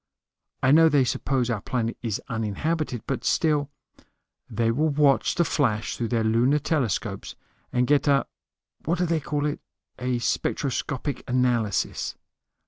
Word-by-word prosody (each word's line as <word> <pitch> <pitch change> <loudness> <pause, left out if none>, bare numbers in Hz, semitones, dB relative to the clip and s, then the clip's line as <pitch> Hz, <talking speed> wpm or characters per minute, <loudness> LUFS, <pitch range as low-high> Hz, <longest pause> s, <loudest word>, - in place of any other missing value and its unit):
I 130 - +5
know 160 +2 +7
they 145 -3 +4
suppose 125 0 0
our 110 -4 -2
planet 115 -1 -2
is 110 -4 -2
uninhabited, 120 - -2
but 135 - -3
still 150 -3 +1 0.4
" - - -52
"They 115 -1 +3
will 155 +7 +1
watch 140 -2 +3
the 170 - +2
flash 115 -8 0
through 120 - -2
their 115 -1 0
lunar 115 +6 +3
telescopes 115 - -2 0.4
and 125 0 +2
get 145 +2 +2
a 140 -1 +4 0.6
what 170 +3 +1
do 180 - +1
they 165 -1 +1
call 145 0 -2
it? 150 - -2 0.4
a 125 0 0
spectroscopic 135 +2 -2
analysis. 120 -5 0
130 Hz, 145 wpm, -25 LUFS, 115-150 Hz, 0.6 s, know